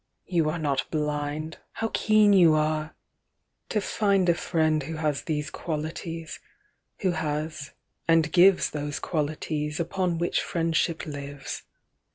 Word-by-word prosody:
you 165 -4 +1
are 160 - -2
not 145 -4 -1
blind! 150 +1 -2
How 225 - -2
keen 215 -1 +5
you 170 -5 +6
are!) 155 0 0 0.7
To 215 - +1
find 200 -2 +1
a - - +6
friend 160 -2 +1
who 160 +4 -5
has 150 -2 -1
these 150 -2 -3
qualities, 165 +1 -5 0.6
Who 190 -3 +2
has, 155 -2 -3 0.3
and 165 -1 +4
gives 185 +1 +5
Those 145 -1 -3
qualities 150 -1 -2
upon 175 0 0
which 170 +1 +1
friendship 165 0 0
lives. 145 -2 -6
160 Hz, 130 wpm, -26 LUFS, 150-175 Hz, 0.7 s, you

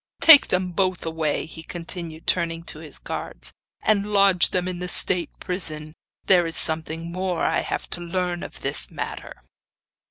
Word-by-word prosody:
Take 315 -4 +9
them 180 0 -1
both 185 -1 -1
away,' 160 -3 -1
he 160 0 -9
continued, 165 -1 -7
turning 165 -1 0
to 155 - -7
his 155 -2 -11
guards, - - -3 0.3
'and 210 -1 +1
lodge 195 -3 +4
them 180 0 -1
in 180 -1 -4
the 180 - -4
state 175 0 +3
prison. 155 -5 -4 0.3
There 180 -3 +4
is 165 - -2
something 160 +1 +1
more 185 -1 -2
I - - +2
have - - -4
to 175 - -1
learn 175 0 -2
of - - -9
this - - -2
matter. - - -6
175 Hz, 165 wpm, -23 LUFS, 165-185 Hz, 0.3 s, Take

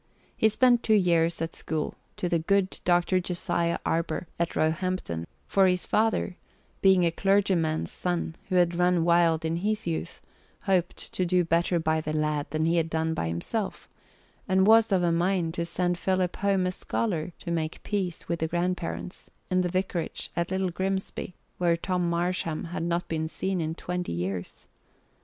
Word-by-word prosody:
He 220 - +4
spent 240 +2 +4
two 220 - +3
years 170 -4 +2
at 165 - -4
school 155 -2 -3 0.2
to 180 - -1
the 170 -1 +1
good 195 +3 +1
Dr. 175 +1 +3
Josiah 170 -1 -1
Arber 165 +1 -1
at 170 0 -1
Roehampton, 155 - -1 0.2
for 195 -1 +4
his 180 -1 +1
father, 215 -4 +1 0.4
being 190 -2 +5
a 170 - +2
clergyman's 190 -4 +1
son 175 -2 -2
who 185 - 0
had 175 -1 +4
run 175 -1 +2
wild 170 -1 +3
in 165 +1 0
his 210 +4 -1
youth, 165 -2 -3 0.4
hoped 185 -4 +1 0.2
to 185 - 0
do 180 0 +2
better 170 +2 +2
by 160 -1 +1
the 155 0 -3
lad 150 -1 0
than 155 +1 0
he 170 +1 +2
had 165 -1 +1
done 160 0 0
by 120 - -2
himself, 85 - -3 0.6
and 190 -1 +3
was 225 +1 +6
of 185 -2 +3
a 170 - +3
mind 170 -1 +1
to 170 -1 -2
send 175 +1 0
Philip 185 -2 0
home 195 -2 +1
a 180 - 0
scholar 180 -3 -2
to 170 - -6
make 160 -1 -2
peace 190 -5 -2
with 170 0 -1
the 160 - 0
grandparents, 175 +1 -3 0.2
in 185 0 +3
the 180 - 0
vicarage 185 -2 -2
at 170 0 -1
Little 190 -1 0
Grimsby, 190 0 -3 0.2
whom 170 -2 +3
Tom 180 0 -1
Marsham 170 -2 -1
had - - -2
not 170 +1 -1 0.2
seen 190 +2 -2
in 160 0 -2
twenty 180 - -3
years. 90 +1 -4
175 Hz, 175 wpm, -27 LUFS, 165-185 Hz, 0.6 s, was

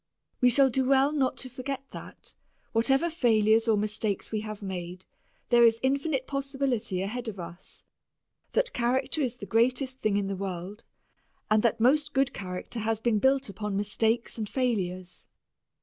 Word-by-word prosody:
We 250 - +5
shall 265 +2 +5
do 265 +2 +1
well 270 +2 +4
not 275 -4 0
to 260 - -5
forget 255 +2 -5
that, - - -10 0.4
whatever 270 +8 +2
failures 225 -6 +3
or 220 -2 +4
mistakes 210 -1 -2
we 215 -1 -1
have 215 -1 -7
made, 180 -1 -6 0.4
there 240 -1 +6
is 230 -1 +5
infinite 275 0 0
possibility 270 -9 -2
ahead 240 +4 -4
of 205 -4 -5
us, 170 +1 -9 0.7
that - - +1
character 260 +5 0
is 250 -3 -1
the 225 - -8
greatest 250 +5 +1
thing 210 -2 +1
in 200 - 0
the 195 0 -3
world, 190 +1 -6 0.7
and 215 0 +5
that 230 0 +1
most 295 +5 +3
good 270 -1 +1
character 185 +4 -6
has 220 0 -1
been 220 -2 +1
built 265 +3 +2
upon 200 0 -4
mistakes 225 +3 0
and 215 -2 -3
failures. 185 -8 -2
230 Hz, 165 wpm, -28 LUFS, 205-265 Hz, 0.7 s, there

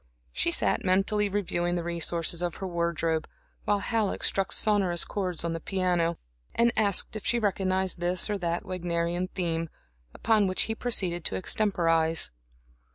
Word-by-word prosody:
She - - +1
sat - - 0
mentally 200 +3 +2
reviewing 175 -3 -1
the 175 - -2
resources 170 0 0
of 175 -2 -2
her 195 - -6
wardrobe, 170 -2 -1 0.4
while 205 - +2
Halleck 220 -3 -1
struck 195 -1 +2
sonorous 195 -5 +2
chords 180 -4 -3
on 170 - -1
the 165 - -3
piano, 175 -2 0 0.4
and 235 0 +4
asked 205 0 +3
if 215 - -5
she 240 - +1
recognized 190 -4 0
this 175 +1 +1
or 205 -2 -2
that 170 -1 -2
Wagnerian 175 0 -2
theme, 165 -3 -2 0.4
upon 215 - +2
which 185 - +3
he 225 - -2
proceeded 185 -8 0
to - - 0
extemporize. 165 - +1
180 Hz, 155 wpm, -27 LUFS, 170-200 Hz, 0.4 s, and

